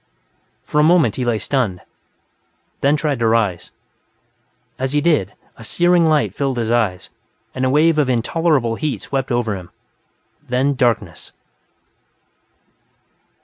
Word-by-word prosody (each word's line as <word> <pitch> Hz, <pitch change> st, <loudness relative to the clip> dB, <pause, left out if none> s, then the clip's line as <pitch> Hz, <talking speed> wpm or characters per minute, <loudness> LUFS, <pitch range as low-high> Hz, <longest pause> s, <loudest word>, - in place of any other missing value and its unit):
For 150 Hz, -, -1 dB
a -, -, +5 dB
moment, 160 Hz, -, +3 dB
he 130 Hz, -, -1 dB
lay 120 Hz, -2 st, +1 dB
stunned, 110 Hz, -7 st, -2 dB, 1.0 s
then 140 Hz, +2 st, +2 dB
tried 150 Hz, -4 st, -1 dB
to 115 Hz, -, +1 dB
rise. 105 Hz, -6 st, 0 dB, 1.1 s
As 130 Hz, +1 st, -2 dB
he 150 Hz, -, +3 dB
did, 145 Hz, -, +1 dB, 0.2 s
a -, -, -12 dB
searing 175 Hz, +6 st, +2 dB
light 155 Hz, -2 st, +1 dB
filled 135 Hz, -3 st, -2 dB
his 115 Hz, -1 st, -1 dB
eyes 110 Hz, -7 st, -1 dB, 0.4 s
and 130 Hz, -, -2 dB
a -, -, +2 dB
wave 155 Hz, +3 st, +3 dB
of 140 Hz, -3 st, +1 dB
intolerable 125 Hz, -1 st, 0 dB
heat 155 Hz, -3 st, -3 dB
swept 135 Hz, -1 st, -3 dB
over 120 Hz, -4 st, 0 dB
him. 90 Hz, -2 st, -9 dB, 0.8 s
Then 130 Hz, +3 st, +1 dB
darkness... 120 Hz, -4 st, -1 dB
130 Hz, 135 wpm, -19 LUFS, 115-150 Hz, 1.1 s, a